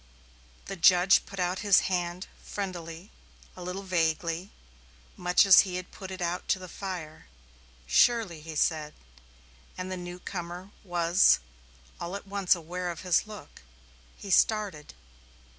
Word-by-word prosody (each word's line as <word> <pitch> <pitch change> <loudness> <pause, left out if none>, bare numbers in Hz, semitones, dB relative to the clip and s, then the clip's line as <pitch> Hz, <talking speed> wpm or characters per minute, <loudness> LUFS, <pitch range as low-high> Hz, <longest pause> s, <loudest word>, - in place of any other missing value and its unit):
The 195 - -6
judge 180 +1 +5
put 195 -1 -9
out 180 +1 0
his 200 -2 +5
hand 180 0 -2 0.2
friendlily, 175 -2 -6 0.4
a 185 - -10
little 180 +2 -5
vaguely, 170 0 -1 0.7
much 180 +2 +3
as 195 - +9
he 185 -2 +2
had 180 0 -6
put 190 -2 -9
it 190 -1 -5
out 175 +1 -3
to - - +2
the 185 -1 -9
fire. 175 - -7 0.6
"Surely," 170 - +2
he 160 0 -8
said, 150 0 0 0.8
and 185 0 -5
the 185 - -3
newcomer 175 +1 -7
was 175 0 +4 0.6
all 175 +3 -5
at 200 - -7
once 195 -2 +2
aware 175 +2 -5
of 170 - -6
his 180 +3 +1
look. 210 -2 -11 0.6
He 200 - -7
started. 200 - +1
180 Hz, 140 wpm, -28 LUFS, 170-190 Hz, 0.8 s, as